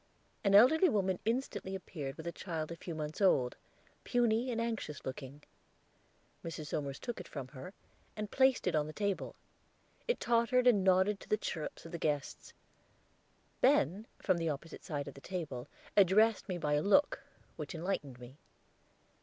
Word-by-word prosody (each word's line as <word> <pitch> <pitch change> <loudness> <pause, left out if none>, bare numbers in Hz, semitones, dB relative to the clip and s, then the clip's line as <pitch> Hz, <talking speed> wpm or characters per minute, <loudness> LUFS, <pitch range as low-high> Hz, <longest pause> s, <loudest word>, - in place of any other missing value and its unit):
An 200 -1 +4
elderly 315 - +7
woman 190 -6 +1
instantly 225 -5 -2
appeared 150 -7 -6
with 160 - -8
a 170 - -2
child 165 -3 -4
a - - -4
few 170 0 -7
months 155 +3 -5
old, 130 -10 +3 0.5
puny 240 0 +2
and 230 -2 -1
anxious 225 -11 -3
looking. 135 +2 -7 1.0
Mrs. 155 -2 -6
Somers 140 -3 -3
took 240 -4 -5
it 180 - -8
from 135 -3 -7
her, 135 +5 -9 0.4
and 210 -1 -5
placed 265 -2 +3
it 180 - +1
on 150 -1 +1
the 155 - -7
table; 200 0 -2 0.7
it 485 - +1
tottered 240 +1 +2
and 220 -6 +5
nodded 190 +2 +3
to - - -14
the 215 - +3
chirrups 165 -7 -5
of 165 - -9
the 170 - -5
guests. 145 -3 -2 1.1
Ben, 195 - +3
from 185 -3 +1
the 165 -1 0
opposite 150 +3 -6
side 145 -5 -4
of 140 - -7
the 140 - -13
table, 150 -10 -5 0.3
addressed 205 +2 +4
me 180 - -1
by 150 -3 0
a 145 - +3
look, 275 - +3 0.3
which 150 0 -6
enlightened 160 -7 -3
me. 125 +3 -12
180 Hz, 170 wpm, -33 LUFS, 150-215 Hz, 1.1 s, elderly